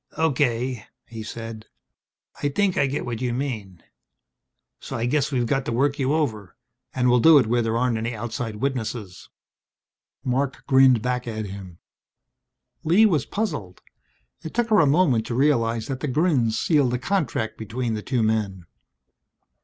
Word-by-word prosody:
"Okay," 130 -6 0 0.2
he 115 -1 -8
said. 115 0 -8 0.7
"I 145 - +1
think 195 +5 +1
I 140 - +2
get 135 +2 -3
what 120 -1 -4
you 125 -2 -1
mean. 110 -10 -5 1.0
So - - -6
I 115 - -1
guess 145 +3 0
we 125 -3 0
got 135 +3 0
to - - -2
work 140 +5 +1
you 135 0 +1
over. 110 - -2 0.4
And 125 -1 0
we'll 125 0 +4
do 160 +5 +7
it 130 - +4
where 120 +2 +1
there 115 0 0
aren't 120 -2 +1
any 115 +1 -3
outside 115 0 -4
witnesses." 115 -6 -4 0.9
Marc 130 +1 -2
grinned 130 -4 +5
back 125 -1 -2
at 110 -2 -4
him. 95 -3 -9 1.1
Lee 180 +8 +5
was 160 - +1
puzzled. 150 - -4 0.6
It 160 -1 -8
took 240 -1 +1
her 215 -2 +5
a 155 - +5
moment 135 -7 +3
to 120 - -3
realize 115 -5 +1
that 135 -2 -4
the 150 - -3
grins 135 -6 +1
sealed 140 -6 +2
a - - 0
contract 135 - -1
between 115 +2 -3
the 105 - -3
two 125 0 -1
men. 105 -5 -1
125 Hz, 165 wpm, -24 LUFS, 115-140 Hz, 1.1 s, do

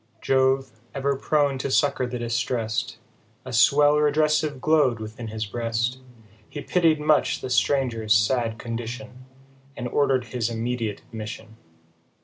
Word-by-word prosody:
Jove, 130 +1 +2 0.2
ever 140 0 0
prone 140 -1 +1
to 135 - -2
succour 135 -1 +1
the 125 0 -4
distrest, 115 -1 -2 0.5
A 130 - -7
swell 145 +6 +5
redressive 150 -1 +1
glow'd 140 -5 +2
within 110 +2 -7
his 110 0 -4
breast, 115 +3 -2 0.5
He 145 - -7
pitied 165 -3 +2
much 150 0 +2
the 130 - -5
stranger's 125 -6 +1
sad 115 +2 +1
condition, 120 +2 -7 0.5
And 120 - -3
order'd 135 0 +1
his 120 0 -2
immediate 115 -2 -3
admission. 110 0 -9
125 Hz, 130 wpm, -24 LUFS, 115-140 Hz, 0.5 s, swell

